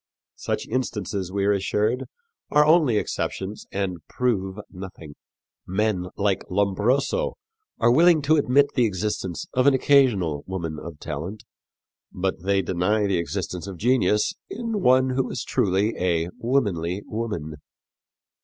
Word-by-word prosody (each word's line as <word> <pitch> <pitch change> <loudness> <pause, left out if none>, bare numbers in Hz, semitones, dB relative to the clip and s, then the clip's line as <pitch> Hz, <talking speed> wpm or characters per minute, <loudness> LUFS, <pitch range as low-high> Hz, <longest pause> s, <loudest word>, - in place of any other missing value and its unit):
Such - - -2
instances, 105 -6 -2
we 100 0 0
are 100 - +4
assured, 105 +5 0 0.4
are 150 0 +5
only 155 -8 +4
exceptions 100 0 -3
and 95 -3 -2
prove 100 -6 -1
nothing. 90 -5 -9 0.5
Men 95 -1 0
like 100 -1 +1
Lombroso 105 - +1 0.4
are 115 +1 +4
willing 165 +3 +5
to 155 +2 +4
admit 145 0 +3
the 125 -3 +3
existence 95 -3 -3
of 130 +2 +3
an 140 - +6
occasional 110 - +3
woman 85 -5 -4
of 80 -2 -9
talent, 85 +9 -6 0.7
but 95 -1 -2
they 95 +1 +1
deny 95 +4 +1
the 95 -3 +1
existence 90 +2 -4
of 95 -2 -7
genius 115 -1 +2 0.2
in 225 -2 -3
one 130 -2 +4
who 130 0 0
is 125 - -4
truly 100 +3 +1
a 85 -2 +1
womanly 100 -7 0
woman. 105 -10 -4
100 Hz, 135 wpm, -24 LUFS, 90-125 Hz, 0.7 s, an